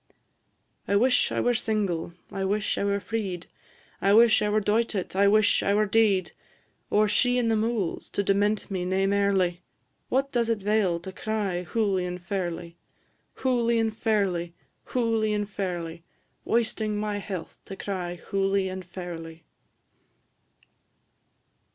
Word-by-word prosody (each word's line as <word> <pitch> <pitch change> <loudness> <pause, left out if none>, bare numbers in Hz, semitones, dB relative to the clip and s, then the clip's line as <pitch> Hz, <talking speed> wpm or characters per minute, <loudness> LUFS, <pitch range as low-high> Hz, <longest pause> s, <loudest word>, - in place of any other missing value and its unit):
I 200 - +2
wish 250 +5 +3
I - - -1
were 245 - +2
single, 200 -7 -1 0.2
I 195 - -3
wish 205 +2 0
I - - 0
were 200 0 +1
freed; 195 -5 -4 0.6
I 195 - +4
wish 230 -1 +6
I 210 - +1
were 215 +1 +3
doited, 210 -2 0
I 200 +1 +4
wish 215 +1 +4
I 200 - +2
were 215 +1 +3
dead; 200 -3 +2 0.6
Or 210 0 +3
she 245 +4 +2
in 240 -2 +1
the 225 - +3
mouls, 220 -4 -1
to 200 - 0
dement 205 +1 +1
me 185 -2 -1
nae 190 +2 +1
mairly. 195 -3 +1 0.5
What 275 +2 +1
does 235 -2 +1
it 230 - +2
'vail 200 -4 +1
to 190 - -7
cry, 200 -3 -2
Hooly 200 -3 0
and 180 0 -5
fairly! 175 -2 -4 0.7
Hooly 240 -3 +2
and 225 -1 0
fairly, 195 -7 0 0.3
hooly 225 -3 0
and 205 -1 -1
fairly; 175 -5 -4 0.4
Wasting 220 -2 0
my 210 -1 -2
health 190 -4 -6
to 195 - -7
cry, 185 -3 -4
Hooly 195 +1 0
and 185 0 -6
fairly. 170 -2 -8
200 Hz, 145 wpm, -26 LUFS, 185-220 Hz, 0.7 s, wish